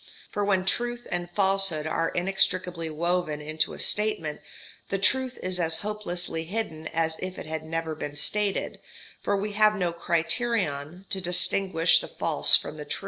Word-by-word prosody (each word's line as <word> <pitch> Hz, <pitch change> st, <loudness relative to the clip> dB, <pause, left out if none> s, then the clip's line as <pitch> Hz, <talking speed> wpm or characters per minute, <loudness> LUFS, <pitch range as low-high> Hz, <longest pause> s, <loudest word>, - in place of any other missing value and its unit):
For 205 Hz, -, -1 dB
when 190 Hz, -2 st, +1 dB
truth 240 Hz, +4 st, -1 dB
and 175 Hz, 0 st, -2 dB
falsehood 195 Hz, -4 st, +1 dB
are 165 Hz, +1 st, 0 dB
inextricably 180 Hz, -2 st, 0 dB
woven 170 Hz, -1 st, -1 dB
into 155 Hz, +1 st, -1 dB
a -, -, -9 dB
statement, 205 Hz, -9 st, 0 dB, 0.5 s
the 195 Hz, -, 0 dB
truth 260 Hz, +5 st, +1 dB
is 185 Hz, 0 st, 0 dB
as 165 Hz, -1 st, +1 dB
hopelessly 175 Hz, -6 st, -3 dB
hidden 160 Hz, -5 st, -4 dB
as 160 Hz, 0 st, -1 dB
if 185 Hz, 0 st, -5 dB
it -, -, -6 dB
had 155 Hz, 0 st, -4 dB
never 165 Hz, 0 st, -3 dB
been 145 Hz, -1 st, -6 dB
stated, 205 Hz, +5 st, -1 dB, 0.4 s
for 200 Hz, -, 0 dB
we 205 Hz, +2 st, -2 dB
have 215 Hz, +1 st, +4 dB
no 180 Hz, -4 st, -1 dB
criterion 170 Hz, -, -1 dB
to 190 Hz, -, -1 dB
distinguish 180 Hz, -1 st, +3 dB
the -, -, -7 dB
false -, -, +5 dB
from -, -, -6 dB
the -, -, -7 dB
true. -, -, -4 dB
180 Hz, 165 wpm, -27 LUFS, 160-200 Hz, 0.5 s, false